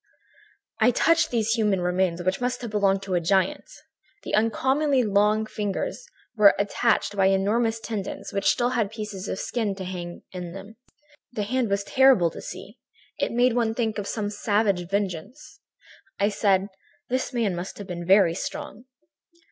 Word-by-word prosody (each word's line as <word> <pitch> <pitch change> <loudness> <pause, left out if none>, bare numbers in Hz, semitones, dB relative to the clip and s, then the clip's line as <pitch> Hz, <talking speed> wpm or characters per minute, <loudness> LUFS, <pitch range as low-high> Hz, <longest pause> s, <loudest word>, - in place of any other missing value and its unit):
"I 220 +1 +5
touched 330 +7 +3
these 225 -2 0
human 210 -4 +2
remains, 180 -1 0
which 185 +5 -1
must 250 0 -2
have 235 - -5
belonged 195 -2 +1
to 195 - -4
a 175 - +2
giant. 190 - 0 0.5
The - - -6
uncommonly 260 +6 +2
long 210 +1 +2
fingers 210 - -4 0.3
were 210 -2 +6
attached 205 +1 +1
by 195 -1 +3
enormous 220 +4 +1
tendons 215 -4 -5
which 200 -1 +2
still 245 0 +2
had 230 -5 0
pieces 210 -3 -6
of - - -3
skin 215 -3 -2
hanging 180 -2 -6
to 180 - -5
them - - -5
in 200 +3 -10
places. - - -50 0.6
This 210 -3 -3
hand 255 -3 0
was 200 0 0
terrible 255 -8 +4
to - - -9
see; - - -9 0.4
it - - 0
made 245 +1 +3
one 230 -2 0
think 220 -3 -1
of 200 - -5
some 205 -2 -3
savage 205 -4 0
vengeance. 205 - -4 0.6
"I 200 +1 +3
said: 200 -2 +1 0.4
"'This 255 +2 -1
man 225 -7 0
must 175 +2 -6
have 205 - -7
been 175 -2 -6
very 185 -1 +5
strong.' 260 - -6
205 Hz, 170 wpm, -25 LUFS, 195-235 Hz, 0.6 s, were